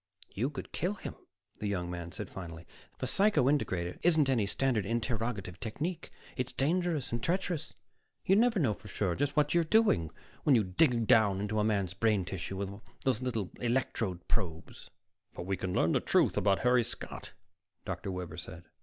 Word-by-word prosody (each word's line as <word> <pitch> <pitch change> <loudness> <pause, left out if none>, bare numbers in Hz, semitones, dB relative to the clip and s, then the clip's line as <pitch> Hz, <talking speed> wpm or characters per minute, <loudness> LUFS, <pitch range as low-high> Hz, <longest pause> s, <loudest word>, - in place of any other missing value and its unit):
"You 120 +7 0
could 145 - -7
kill 185 +5 -1
him," - - -6 0.5
the 105 - -2
young 90 -3 -2
man 85 -1 -5
said 95 - -6
finally. 85 -3 -8 0.3
"The - - -3
psycho 205 -7 +3
integrator 90 -11 0
isn't 155 -5 +4
any 110 -6 +2
standard 125 -1 +1
interrogative 110 -4 -2
technique; 160 - -4 0.2
it's 130 0 -2
dangerous 160 -1 0
and 120 0 -2
treacherous. 175 -1 -1 0.5
You 195 - +5
never 230 +1 +4
know 135 - +2
for 105 - -13
sure 100 -3 -1
just 140 - -1
what 145 -1 +3
you're 170 -1 +4
doing 165 - +3 0.3
when 145 - +5
you 110 - +4
dig 115 - +3
down 105 -3 +5
into 105 +1 -1
a - - +3
man's 100 -4 +1
brain 105 -2 +2
tissue 95 0 -5
with 100 +1 -5 0.2
those 130 -3 +1
little 115 -7 -2
electrode 115 -7 -1
probes." 85 -7 -3 0.5
"But - - -5
we 95 +1 0
can 95 0 -3
learn 85 -3 +2
the - - +3
truth - - +3
about 100 -1 +2
Harry 125 0 +4
Scott," - - -7 0.5
Dr. - - -4
Webber 90 -2 -5
broke 90 - -7
in. 85 +2 -9
110 Hz, 180 wpm, -31 LUFS, 95-140 Hz, 0.5 s, You